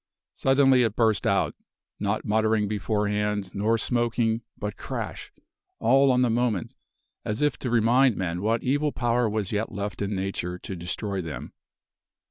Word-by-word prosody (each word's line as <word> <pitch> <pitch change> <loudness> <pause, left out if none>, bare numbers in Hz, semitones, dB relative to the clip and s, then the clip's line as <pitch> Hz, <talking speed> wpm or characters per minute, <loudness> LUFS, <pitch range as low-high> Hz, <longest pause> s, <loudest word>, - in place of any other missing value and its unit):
Suddenly 135 -1 +4
it 115 -3 +1
burst 110 -3 +2
out - - +2 0.5
not 105 +1 -1
muttering 110 0 +2
beforehand, 105 -1 -1
nor 110 +3 +1
smoking 120 -1 0 0.2
but 105 -1 -4
crash! - - -6 0.5
all 135 +4 +4
on 125 0 +3
the 125 - +2
moment, 115 -6 0 0.5
as 105 +1 -3
if 145 -2 +2
to 125 - -3
remind 120 +2 +4
men 90 -1 -2
what 110 +2 0
evil 145 +3 +1
power 120 -2 +1
was 105 -3 -2
yet 105 +1 -1
left 100 -1 -4
in 100 0 -1
nature 95 -2 -3
to 95 - -7
destroy 95 +3 -3
them. 80 -3 -7
110 Hz, 150 wpm, -26 LUFS, 100-120 Hz, 0.5 s, Suddenly